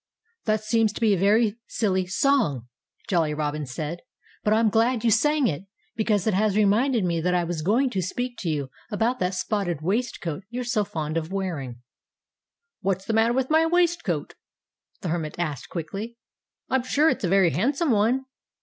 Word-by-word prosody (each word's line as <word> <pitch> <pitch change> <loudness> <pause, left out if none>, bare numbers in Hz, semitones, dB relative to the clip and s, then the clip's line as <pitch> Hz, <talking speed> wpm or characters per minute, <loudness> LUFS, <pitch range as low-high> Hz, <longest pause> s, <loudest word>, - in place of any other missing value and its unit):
"That 215 -1 +1
seems 220 0 +2
to - - -8
me 220 - +5
to - - +5
be - - +5
a 190 - 0
very 215 +2 +3
silly 190 -4 0
song," 190 - +1 0.4
Jolly 165 -5 +1
Robin 150 -1 -2
said. 150 +7 -4 0.4
"But 210 - +1
I'm 220 0 +4
glad 230 +1 +2
you 230 - +3
sang 295 +6 +3
it, 165 +4 -3 0.3
because 210 -3 +1
it 220 - +2
has 210 +1 +2
reminded 215 +3 +3
me 170 -2 0
that 180 +2 +1
I 175 - +2
was 170 -2 -3
going 235 - +2
to 190 - -1
speak 245 +8 -3
to 175 - -2
you 140 -4 -2 0.2
about 230 +3 0
that 180 -1 0
spotted 180 -4 -1
waistcoat 190 -4 -2
you're 245 +2 -4
so 235 -3 +1
fond 155 -4 -3
of 165 +2 -3
wearing." 145 -11 -4 1.0
"What's 190 0 -1
the 225 - -1
matter 225 +2 +3
with 265 +2 0
my 320 +1 +4
waistcoat?" 345 0 0 0.7
the 180 - -3
Hermit 160 -2 -2
asked 155 -6 -3
quickly. 195 +8 -5 0.5
"I'm 265 - +1
sure 285 +5 +2
it's 260 - +1
a 180 - +1
very 190 -2 +4
handsome 275 - +1
one." 235 +5 +2
205 Hz, 185 wpm, -25 LUFS, 170-235 Hz, 1.0 s, me